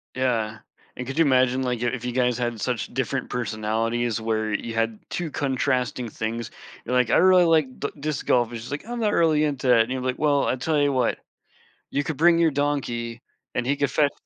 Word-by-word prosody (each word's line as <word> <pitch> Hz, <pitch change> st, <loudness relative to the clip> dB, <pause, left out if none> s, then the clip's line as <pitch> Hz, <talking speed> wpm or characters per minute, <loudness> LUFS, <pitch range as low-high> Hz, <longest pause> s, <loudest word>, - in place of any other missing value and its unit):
Yeah, 115 Hz, -4 st, -1 dB, 0.4 s
and 125 Hz, -, -5 dB
could 135 Hz, +3 st, -6 dB
you 165 Hz, -, +6 dB
imagine, 130 Hz, -1 st, +3 dB
like, 125 Hz, -2 st, -2 dB
your 120 Hz, -1 st, +1 dB
if 125 Hz, -1 st, -5 dB
you 125 Hz, -, -1 dB
guys 125 Hz, -1 st, +1 dB
had 120 Hz, -2 st, -2 dB
such 120 Hz, 0 st, -2 dB
different -, -, -2 dB
personalities 115 Hz, 0 st, -1 dB
where 110 Hz, -1 st, -1 dB
you 115 Hz, +2 st, -3 dB
had 115 Hz, -1 st, -1 dB
2 175 Hz, -2 st, -3 dB
contrasting 130 Hz, -3 st, -1 dB
things, 115 Hz, +2 st, -4 dB, 0.4 s
you're 125 Hz, -, -1 dB
like, 125 Hz, -2 st, +3 dB
"I -, -, +4 dB
really 185 Hz, 0 st, +6 dB
like 155 Hz, -6 st, +2 dB
d 145 Hz, -, -2 dB
disc 150 Hz, 0 st, -3 dB
golf," 120 Hz, -2 st, +3 dB
and 120 Hz, -, -6 dB
she's 115 Hz, +4 st, -9 dB
like, 145 Hz, +7 st, -4 dB
"I'm 240 Hz, +1 st, -5 dB
not 210 Hz, -2 st, +1 dB
really 155 Hz, -2 st, +3 dB
into 135 Hz, -4 st, +1 dB
it," 115 Hz, -, +6 dB
and 115 Hz, -, -8 dB
you're 130 Hz, 0 st, -2 dB
like, 130 Hz, 0 st, -2 dB
"Well, 145 Hz, -2 st, +2 dB
I -, -, +1 dB
tell 150 Hz, +4 st, 0 dB
you 145 Hz, 0 st, +3 dB
what, 130 Hz, -3 st, 0 dB, 0.7 s
you 145 Hz, -, 0 dB
could 155 Hz, 0 st, -3 dB
bring 170 Hz, +2 st, +5 dB
your 165 Hz, -1 st, +4 dB
donkey 125 Hz, -5 st, -2 dB, 0.3 s
and 125 Hz, -, -1 dB
he 140 Hz, +2 st, +1 dB
could 140 Hz, -1 st, 0 dB
fetch" 145 Hz, +1 st, +2 dB
125 Hz, 225 wpm, -24 LUFS, 120-145 Hz, 0.7 s, you